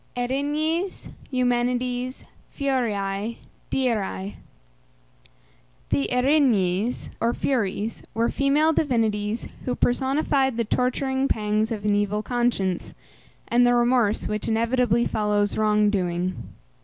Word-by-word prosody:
ERINYES, 295 +8 -1 0.2
EUMENIDES 250 0 -1 0.3
(FURIÆ, 225 -6 -1 0.3
DIRÆ). 210 -6 -1 1.6
The 140 -1 0
Erinyes 250 -6 +2
or 235 +1 +1
Furies 220 -4 -1
were 230 +1 +2
female 295 +3 +3
divinities 225 -6 0 0.2
who 250 - -1
personified 265 0 +1
the 235 - 0
torturing 265 +3 0
pangs 215 0 0
of 210 -2 -4
an 210 - +3
evil 205 +1 0
conscience, 240 -7 -1 0.5
and 240 +1 +3
the 245 0 +4
remorse 240 -3 +2
which 210 0 -3
inevitably 235 +1 +2
follows 210 -1 0
wrong 210 -1 +3
doing. 180 -2 -2
235 Hz, 100 wpm, -24 LUFS, 210-255 Hz, 1.6 s, the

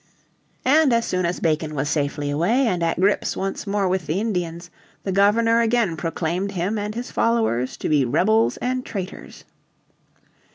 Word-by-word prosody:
And 295 +1 +4
as 230 0 +2
soon 185 -1 0
as 175 - -3
Bacon 155 -1 -1
was 140 +1 -1
safely 145 -1 -1
away, 205 - +2
and 180 -7 0
at 165 0 0
grips 200 +3 +1
once 195 +1 -3
more 200 -1 0
with 180 -3 -1
the 160 +5 0
Indians, 175 -5 -3 0.3
the 195 - -2
Governor 225 +4 +3
again 230 -6 +1
proclaimed 170 +4 -2
him 195 +4 -1
and 210 +1 -4
his 240 +1 -5
followers 220 - 0
to - - -3
be 150 -3 +3
rebels 220 - +2
and 255 +1 -2
traitors. 195 -4 -7
190 Hz, 165 wpm, -22 LUFS, 165-225 Hz, 0.3 s, And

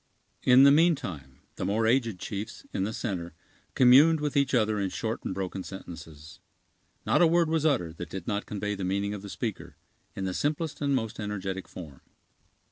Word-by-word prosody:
In 130 +1 +6
the 140 - +8
meantime, 130 - +1 0.2
the - - -3
more 110 +3 +1
aged 115 -3 +2
chiefs, 105 +4 -6
in 95 - 0
the 105 - -3
center, 90 -8 -4 0.4
communed 140 +6 +6
with 150 0 -2
each 140 -1 +2
other 110 -3 +2
in 100 -1 -1
short - - -4
and - - -3
broken 95 0 -4
sentences. 80 -5 -10 0.7
Not - - +3
a 170 - +7
word 170 0 +3
was 160 -1 +2
uttered 85 - 0
that 85 - -6
did 95 0 -7
not 105 -1 -2
convey 105 0 -3
the 100 -1 -5
meaning 100 +2 -1
of 105 - -6
the 100 - -9
speaker, 110 0 -5 0.4
in 95 - -3
the 95 - -2
simplest 150 - -2
and 140 -1 +1
most 115 -4 -3
energetic 95 -2 -4
form. 75 -7 -10
105 Hz, 190 wpm, -28 LUFS, 95-135 Hz, 0.7 s, the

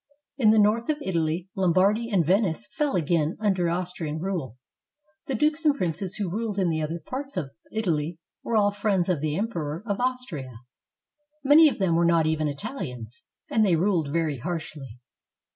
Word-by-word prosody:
In 225 -4 +5
the 220 - +5
north 215 +4 +3
of 305 - +1
Italy, 170 - -1
Lombardy 195 +5 +2
and 190 -7 +2
Venice 175 - +1
fell 295 -2 0
again 165 -1 +1
under 190 -5 +1
Austrian 170 -3 -3
rule. 165 - -3 0.7
The 270 - -1
dukes 300 +6 +1
and 300 -3 +4
princes 185 - -2
who 205 -3 -2
ruled 215 0 -3
in 185 -3 +2
the 160 -1 -1
other 160 +2 -3
parts 270 - -6
of 145 -7 -3 0.2
Italy 170 -7 -1 0.3
were 230 - 0
all 205 -1 +4
friends 200 -3 0
of 170 -6 0
the 155 0 -1
Emperor 170 -6 -3
of 200 -3 -2
Austria; 245 - -3 0.9
many 300 +3 +7
of - - -5
them 190 -4 +1
were 170 - +3
not 170 -1 +3
even 155 -1 +1
Itahans; 140 - -5 0.3
and 220 - +3
they 190 -5 +4
ruled 165 -4 +1
very 155 -4 0
harshly. 150 -5 -6
180 Hz, 175 wpm, -26 LUFS, 160-215 Hz, 0.9 s, many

